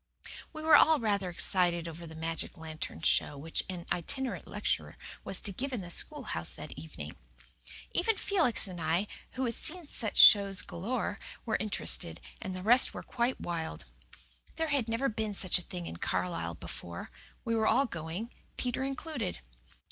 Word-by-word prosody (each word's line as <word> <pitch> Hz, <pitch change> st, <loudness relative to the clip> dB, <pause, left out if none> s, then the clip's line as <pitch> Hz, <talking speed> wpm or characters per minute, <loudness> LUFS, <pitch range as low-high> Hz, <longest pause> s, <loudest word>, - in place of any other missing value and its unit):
We 310 Hz, -1 st, -7 dB
were 315 Hz, -1 st, +7 dB
all 315 Hz, +1 st, +7 dB
rather 200 Hz, -5 st, 0 dB
excited 175 Hz, -1 st, +3 dB
over 165 Hz, +1 st, -8 dB
the 160 Hz, -, -10 dB
magic 165 Hz, +3 st, -1 dB
lantern 160 Hz, -1 st, -6 dB
show 145 Hz, -, +2 dB
which 160 Hz, +3 st, 0 dB
an 175 Hz, -2 st, -5 dB
itinerant 260 Hz, -, -1 dB
lecturer -, -, -2 dB, 0.3 s
was 190 Hz, -, +1 dB
to 205 Hz, -, -1 dB
give 270 Hz, +8 st, -4 dB
in 245 Hz, -5 st, -2 dB
the 175 Hz, -1 st, -7 dB
schoolhouse 255 Hz, -, -4 dB
that -, -, -8 dB
evening. 80 Hz, -2 st, -8 dB, 0.8 s
Even 430 Hz, +5 st, +2 dB
Felix 320 Hz, -, +1 dB
and 180 Hz, -2 st, -7 dB
I, 165 Hz, +5 st, +1 dB, 0.3 s
who 260 Hz, 0 st, -1 dB
had 235 Hz, -, -1 dB
seen 340 Hz, +7 st, -2 dB
such 220 Hz, -7 st, -2 dB
shows 200 Hz, -2 st, +8 dB
galore, 205 Hz, +3 st, -3 dB, 0.3 s
were 220 Hz, -2 st, 0 dB
interested, 80 Hz, -, +2 dB, 0.2 s
and 185 Hz, -, -4 dB
the 185 Hz, -, -6 dB
rest 245 Hz, +5 st, +6 dB
were -, -, -5 dB
quite 240 Hz, +1 st, -1 dB
wild. 160 Hz, -, -4 dB, 0.7 s
There 320 Hz, -1 st, -1 dB
had 270 Hz, -6 st, +1 dB
never 230 Hz, +4 st, +1 dB
been 215 Hz, -3 st, -2 dB
such 185 Hz, -2 st, +3 dB
a -, -, -6 dB
thing 180 Hz, -1 st, -7 dB
in 85 Hz, -, -6 dB
Carlisle 85 Hz, -2 st, -2 dB
before. 85 Hz, +2 st, -7 dB, 0.3 s
We 230 Hz, -, 0 dB
were 220 Hz, -1 st, +2 dB
all 275 Hz, -, +4 dB
going, 175 Hz, -, -5 dB, 0.3 s
Peter 250 Hz, +1 st, -1 dB
included. 270 Hz, -, -3 dB
200 Hz, 170 wpm, -31 LUFS, 165-250 Hz, 0.8 s, shows